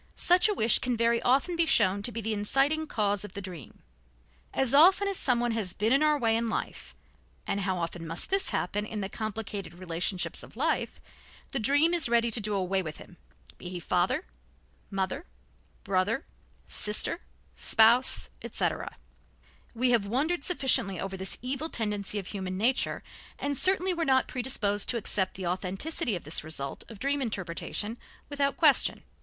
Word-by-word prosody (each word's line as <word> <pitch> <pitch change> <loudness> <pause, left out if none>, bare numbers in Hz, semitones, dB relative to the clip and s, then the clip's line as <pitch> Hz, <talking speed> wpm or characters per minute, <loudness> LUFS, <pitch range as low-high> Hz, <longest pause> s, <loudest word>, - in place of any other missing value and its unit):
Such 360 +4 +4
a 420 - 0
wish 225 - +4
can 245 -2 -2
very 235 0 +2
often 275 +8 +2
be 335 -1 +1
shown 200 -5 +3
to 240 - -1
be 230 0 -5
the 220 +1 -2
inciting 275 +9 +1
cause 205 -4 0
of 205 - -9
the 200 - -5
dream. 175 - -11 0.7
As 265 -1 +1
often 370 +7 +6
as 395 - 0
someone 240 -6 +2
has 210 -6 0
been 215 +5 +1
in 275 - +3
our 305 -1 +3
way 225 -4 +1
in 230 0 -1
life - - -5 0.5
and 200 - -2
how 190 -1 -1
often 170 -1 -5
must 165 - -1
this 390 0 +1
happen 205 +3 -2
in 215 0 -5
the 195 - -4
complicated 210 -4 -6
relationships 180 +1 -2
of - - -11
life - - -1 0.5
the 270 - -1
dream 290 +9 +3
is 335 -8 +4
ready 235 0 +2
to 225 - +2
do 210 0 -2
away 190 0 0
with 155 -4 -7
him, 175 - -14 0.4
be 180 - -7
he 180 -1 -5
father, 185 - 0 0.6
mother, 195 - -3 0.6
brother, 200 - 0 0.4
sister, 210 +10 0 0.3
spouse, 230 +3 +4
etc. - - -2 0.8
We 250 +2 +2
have 225 -4 +2
wondered 285 +9 -1
sufficiently 265 - +2
over 195 0 -4
this 190 0 -2
evil 275 +5 -2
tendency 210 -4 -1
of 200 - -4
human 185 -1 -5
nature, 240 +6 +1 0.3
and 285 0 -2
certainly 375 +4 +2
were 340 -1 -2
not 260 -3 +2
predisposed 220 -5 0
to 240 - +1
accept 195 -3 0
the 185 - -5
authenticity 190 - -2
of 175 - -6
this 155 +1 -1
result 140 -3 -2
of 225 - -10
dream 280 +5 -1
interpretation 210 +1 -3 0.3
without 280 -1 -1
question. 305 -6 +3
225 Hz, 170 wpm, -28 LUFS, 195-270 Hz, 0.8 s, often